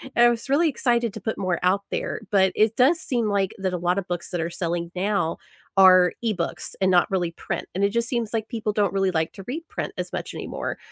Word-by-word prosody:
I 240 0 +6
was 240 +3 -3
really 315 +4 +4
excited 240 -4 0
to - - -5
put 220 - -3
more 185 -3 0
out 190 +2 +3
there, - - -3
but 190 -2 +4
it 215 +1 +3
does 295 +7 +4
seem, 240 -4 -1
like, 200 +1 0
that 190 -1 -2
a - - 0
lot 180 +2 +1
of 185 - -7
books 175 -2 -4
that 175 - -2
are 170 +1 -3
selling 170 0 -3
now 195 -3 0 0.4
are 185 -2 +7
e-books 200 -7 -2
and 190 - +4
not 175 -1 +4
really 180 -3 0
print, - - -5
and 195 - 0
it, 200 - +4
just, 235 +2 0
seems, 235 -4 -1
like, 220 -1 -1
people 220 -3 -2
don't 205 -3 +1
really 195 -1 +1
like 160 -2 0
to 195 - -10
read 310 +7 -4
print - - -4
as - - -4
much - - -4
anymore. - - -4
195 Hz, 240 wpm, -24 LUFS, 180-230 Hz, 0.4 s, are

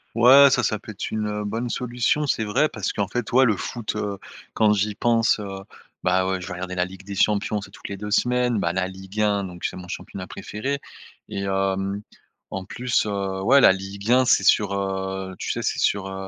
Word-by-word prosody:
Ouais, 130 +4 +8
ça, 135 - +2
ça 105 - 0
peut 110 - -9
être 100 - -5
une, 110 -1 -1
heu, 105 0 -3
bonne 115 +4 -3
solution. 125 +5 0
C'est 110 -5 0
vrai, 125 +9 +2
parce 100 -3 -3
qu'en 100 -2 -1
fait, 120 -2 -3
ouais, 130 +2 +6
le 110 -6 +3
foot, 115 -1 -4
heu, 100 -1 -3 0.4
quand 110 -1 +3
j'y 105 0 0
pense, 115 -1 +2
heu, 95 -1 -6 0.4
bah 90 +1 +2
ouais, 95 0 -1
je 90 - -8
vais - - -5
regarder 90 +1 -5
la 90 0 +1
Ligue 95 +1 -11
des 100 0 -7
Champions, 105 +1 +1
c'est 100 - -10
toutes - - -10
les 100 - -5
2 105 +1 -6
semaines, 125 +1 +2
bah, 85 - +1
la 95 +1 -1
Ligue 95 +2 -9
1, 105 -1 +2
donc, 90 -2 -7
c'est - - -2
mon 90 -1 -9
championnat 95 +1 -6
préféré 130 +9 -4 0.5
et 100 - -4
hem, 95 +1 -1 0.5
en 95 - -5
plus, 125 +6 -1
heu, 100 -2 -2
ouais 135 +7 +6
la 95 - +7
Ligue 100 +3 -4
1 130 +1 +6
c'est 120 - +4
sur, 105 -3 +4
heu, 95 -1 -3
tu - - -3
sais, - - -3
c'est - - -1
sur, 100 -1 +1
heu 95 0 -6
100 Hz, 230 wpm, -23 LUFS, 95-115 Hz, 0.5 s, Ouais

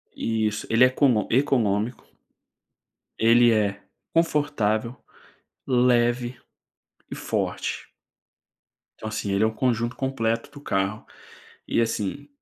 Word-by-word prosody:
Isso, 110 -2 -1
ele 115 +3 +6
é - - +6
econô 130 -4 +2
econômico. 120 -4 +1 1.1
Ele 120 +1 +6
é 100 -2 0 0.3
confortável, 145 -8 +1 0.7
leve 120 -1 +2 0.7
e - - -4
forte. - - -3 1.1
Então 110 - -6
assim, 105 -2 -3
é 110 - +5
um 110 - -3
conjunto 120 0 0
completo 115 -3 -2
do 145 - -12
carro, 100 -5 -2 0.6
e - - +1
assim, 115 +5 -2
115 Hz, 100 wpm, -24 LUFS, 110-130 Hz, 1.1 s, ele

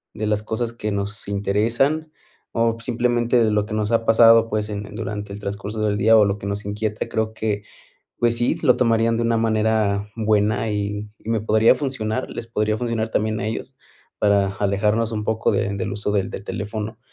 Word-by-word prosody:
de 110 0 -3
las 105 0 0
cosas 115 +2 -3
que 105 -2 -4
nos 100 +1 -2
interesan 115 +10 0 0.4
o 115 0 +1
simplemente 120 0 +1
de 110 - +2
lo 105 0 +1
que 105 - -4
nos 105 0 -1
ha 115 0 +2
pasado, 115 0 +6
pues 105 0 -2
en 105 0 -4
en - - -11
durante 105 -2 -5
el 100 - -7
transcurso 100 +1 -5
del 105 -1 +1
día 110 +2 +5
o 105 - +6
lo 100 0 -1
que 100 - -6
nos 100 0 -4
inquieta. 105 +1 -3
Creo 110 0 -2
que 105 -2 -2 0.6
pues 120 0 +2
sí, 120 +1 +1
lo 125 -5 +4
tomarían 115 -1 +2
de 115 - 0
una 115 0 +2
manera 110 -2 +1
buena 110 0 +1
y 105 0 -3
y - - -12
me 115 -1 +1
podría 110 +3 +4
funcionar, 130 -3 -3
les 115 - -6
podría 110 -1 -1
funcionar 115 -2 -2
también 110 0 0
a 105 - -2
ellos 125 +4 -5 0.4
para 100 -2 +3
alejarnos 105 +3 +1
un 105 -1 -3
poco 110 0 +1
de 100 - 0
del 100 +1 -3
uso 105 0 -2
del 100 -2 0
del 100 - -7
teléfono. 105 +2 -5
110 Hz, 205 wpm, -22 LUFS, 105-115 Hz, 0.6 s, pasado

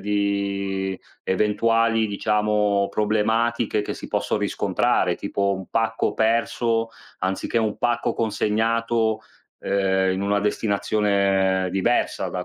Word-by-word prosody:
di 100 -1 -1 0.2
eventuali 115 +3 +2
diciamo 105 -1 +1
problematiche 110 +1 +1
che - - -4
si - - -9
possono - - -1
riscontrare, - - +1
tipo 100 0 -1
un 95 -1 -7
pacco 115 0 0
perso, 115 0 +1 0.3
anziché 95 +5 -1
un 110 -2 -1
pacco 120 -1 0
consegnato, 110 0 0 0.4
ehm, 95 -1 +1
in 95 - -2
una 100 0 +1
destinazione 100 -3 +1
diversa 95 +6 0
da - - -4
105 Hz, 105 wpm, -23 LUFS, 100-115 Hz, 0.4 s, eventuali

